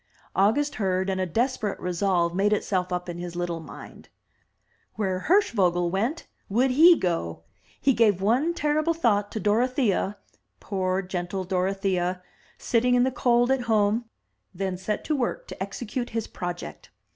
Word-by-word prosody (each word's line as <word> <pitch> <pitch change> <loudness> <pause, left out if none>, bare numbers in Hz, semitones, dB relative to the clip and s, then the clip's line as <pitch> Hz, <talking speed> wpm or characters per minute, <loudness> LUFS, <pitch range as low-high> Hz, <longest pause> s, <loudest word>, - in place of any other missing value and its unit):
August 255 +10 +2
heard, 190 0 0
and 190 0 -1
a 185 - -1
desperate 225 - -1
resolve 180 -1 0
made 200 +3 +2
itself 185 -3 -1
up 180 0 -2
in 175 -1 -6
his 175 -1 -6
little 175 -1 -2
mind. 160 - -12 0.9
Where 190 -3 -2
Hirschvogel 185 - +3
went, 230 - -1 0.2
would 250 +6 +2
he 330 +6 +7
go. 85 - -2 0.4
He 275 - +3
gave 215 -6 +3
one 255 - +1
terrible 310 +2 +1
thought 205 -9 +1
to 220 - -3
Dorothea 215 -1 +1 0.2
— - - -49
^poor, 185 -1 -2
gentle 185 +1 -3
Dorothea! 185 -1 -1 0.2
— - - -30
sitting 245 +1 +2
in 245 - +4
the 260 - +1
cold 245 0 +2
at 265 -1 +2
home, 215 +2 +2 0.5
then 190 0 -2
set 190 +4 -3
to 310 - 0
work 250 -4 -2
to - - -9
execute 230 +5 -4
his 225 -1 -3
pro 175 0 -4
ject. 175 - -10
200 Hz, 160 wpm, -26 LUFS, 180-245 Hz, 0.9 s, he